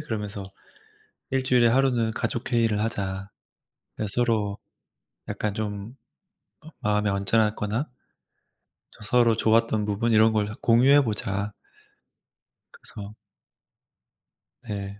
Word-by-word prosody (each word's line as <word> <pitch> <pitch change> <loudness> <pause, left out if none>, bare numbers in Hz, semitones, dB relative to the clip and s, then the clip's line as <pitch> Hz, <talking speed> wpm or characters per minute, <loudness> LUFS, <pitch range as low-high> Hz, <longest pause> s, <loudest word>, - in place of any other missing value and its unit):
그러면서 105 -7 -4 0.9
"일주일에 130 -2 +3
하루는 120 -3 +2
가족 120 +3 -3
회의를 115 -3 +2
하자." 95 -3 -3 0.7
예. 110 - 0
"서로 105 -2 0 0.7
약간 105 -1 -2
좀 105 +2 -5 0.7
음 160 - -12
마음이 105 0 +1
언짢았거나" 105 +5 0 1.0
저 - - -15
서로 115 +1 +3
좋았던 110 -1 +2
부분 110 +3 0
이런 110 0 +5
걸 105 -1 +1
다 105 - -6
공유해 135 +4 +5
보자. 105 -2 -2 1.2
그래서 105 - -8 1.5
네. 100 -2 -6
110 Hz, 215 characters per minute, -25 LUFS, 105-120 Hz, 1.5 s, 이런